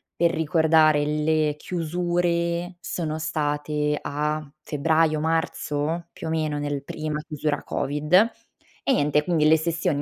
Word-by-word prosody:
per 170 Hz, 0 st, +3 dB
ricordare, 160 Hz, -2 st, +3 dB
le 150 Hz, 0 st, +1 dB
chiusure 175 Hz, +1 st, -1 dB
sono 160 Hz, -3 st, -3 dB
state 150 Hz, -1 st, -1 dB
a 150 Hz, +1 st, -2 dB
febbraio, 155 Hz, +1 st, +1 dB
marzo? 160 Hz, 0 st, -1 dB
Più -, -, -7 dB
o -, -, -2 dB
meno 155 Hz, -2 st, -1 dB
nel 145 Hz, -1 st, -3 dB
prima 155 Hz, +1 st, -4 dB
chiusura 150 Hz, -1 st, -2 dB
Covid; 145 Hz, +3 st, -3 dB, 0.7 s
e 275 Hz, -, +2 dB
niente, 150 Hz, -, +2 dB
quindi 160 Hz, -3 st, +2 dB
le 160 Hz, +1 st, +6 dB
sessioni 160 Hz, -3 st, -1 dB
155 Hz, 125 wpm, -24 LUFS, 150-165 Hz, 0.7 s, le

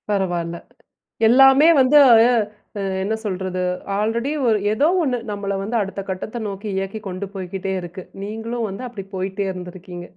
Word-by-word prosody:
பரவால்ல. 175 Hz, -4 st, -1 dB, 0.7 s
எல்லாமே 270 Hz, +5 st, +7 dB
வந்து 260 Hz, +3 st, +5 dB
அ -, -, +8 dB, 0.9 s
என்ன 215 Hz, +3 st, -1 dB
சொல்றது. 185 Hz, -2 st, -3 dB, 0.4 s
ஆல்ரெடி 230 Hz, +6 st, 0 dB, 0.2 s
ஒரு 220 Hz, -2 st, +4 dB, 0.2 s
ஏதோ 285 Hz, +8 st, +3 dB
ஒன்னு 260 Hz, -6 st, 0 dB
நம்மள 200 Hz, -1 st, -3 dB
வந்து 220 Hz, +4 st, -3 dB
அடுத்த 195 Hz, 0 st, -4 dB
கட்டத்த 190 Hz, +5 st, -4 dB
நோக்கி 200 Hz, +1 st, -6 dB
இயக்கிக் 195 Hz, +2 st, -4 dB
கொண்டு 185 Hz, +1 st, -4 dB
போய்க்கிட்டே 190 Hz, 0 st, -4 dB
இருக்கு. 180 Hz, +1 st, -8 dB, 0.2 s
நீங்களும் 225 Hz, +2 st, -4 dB
வந்து 195 Hz, +7 st, -6 dB
அப்டி 215 Hz, -6 st, -8 dB
போயிட்டே 190 Hz, +2 st, -2 dB
இருந்துருக்கீங்க! 180 Hz, -1 st, -8 dB
200 Hz, 140 wpm, -21 LUFS, 185-225 Hz, 0.9 s, அ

